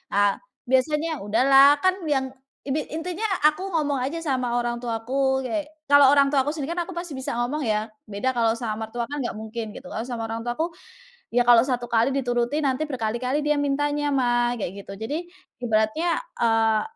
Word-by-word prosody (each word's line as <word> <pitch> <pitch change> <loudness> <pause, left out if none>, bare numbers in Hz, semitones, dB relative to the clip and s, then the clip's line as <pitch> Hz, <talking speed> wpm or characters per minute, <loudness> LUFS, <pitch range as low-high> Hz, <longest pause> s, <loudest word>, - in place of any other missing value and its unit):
ah 205 0 +3 0.2
biasanya, 300 +5 +1
udahlah 270 +7 +6
kan 370 +1 +3
yang 265 -3 0 0.3
ini 285 +2 -2
intinya 355 +6 -3 0.2
aku 310 +6 +2
ngomong 290 -3 +1
aja 330 +5 -4
sama 255 -6 -1
orang 240 0 0
tuaku 255 +3 -1
kayak 300 +3 -2 0.2
kalau 285 -1 +7
orang 280 -1 +5
tuaku 285 +1 +1
sendiri 325 +2 -4
kan 345 - 0
aku 370 - -8
pasti 345 -5 -6
bisa 265 - -4
ngomong 245 +4 -2
ya, 215 0 0 0.2
beda 205 +5 -2
kalau 225 -1 +3
sama 220 -2 -4
mertua 235 +2 -5
kan 290 - -4
nggak 250 -5 -2
mungkin 220 0 -6
gitu, 270 - -10
kalau 225 -2 -4
sama 230 -3 -4
orang 225 +1 -4
tuaku, 280 +8 -1 0.6
"Ya 245 +1 +2
kalau 240 -1 +7
1 250 -1 -1
kali 235 +1 +2
dituruti 245 0 0
nanti 285 +1 -1
berkali-kali 255 +3 -1
dia 300 - +3
mintanya 290 +1 0
Mah," 240 -2 +1
kayak 200 -2 -5
gitu 195 0 -10
jadi 280 - -3 0.4
ibaratnya, 240 +9 +1 0.2
eee, 225 -2 +3
260 Hz, 180 wpm, -24 LUFS, 230-290 Hz, 0.6 s, kalau